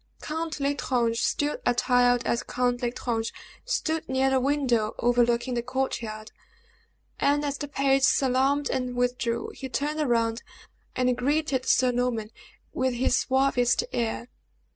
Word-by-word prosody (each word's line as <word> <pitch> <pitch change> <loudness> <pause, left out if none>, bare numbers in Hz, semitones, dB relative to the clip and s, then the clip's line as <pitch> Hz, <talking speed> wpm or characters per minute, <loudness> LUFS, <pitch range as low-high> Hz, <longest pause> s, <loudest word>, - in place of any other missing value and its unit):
Count 320 0 -4
L'Estrange, 250 -5 0
still 295 0 0
attired 245 0 +3
as 235 - 0
Count 245 -1 -1
L'Estrange, 235 -2 -2 0.3
stood 320 - -2
near 265 0 +2
a 265 - +4
window 255 -5 +1
overlooking 240 +1 +2
the 240 - 0
court 260 +1 -2
yard, 215 -1 -7 0.9
and 290 +1 +2
as 285 -1 -1
the 290 - -4
page 275 -1 +2
salaamed 270 +1 +2
and 250 -1 -2
withdrew, 245 -1 -1
he 265 - -7
turned 300 +4 -2
round, 230 0 +1 0.5
and 250 -1 +2
greeted 275 +1 0
Sir 255 -1 +4
Norman 240 -3 -1 0.4
with 260 -1 0
his 245 - +2
suavest 265 - +2
air. 235 +1 -2
250 Hz, 135 wpm, -26 LUFS, 240-275 Hz, 0.9 s, a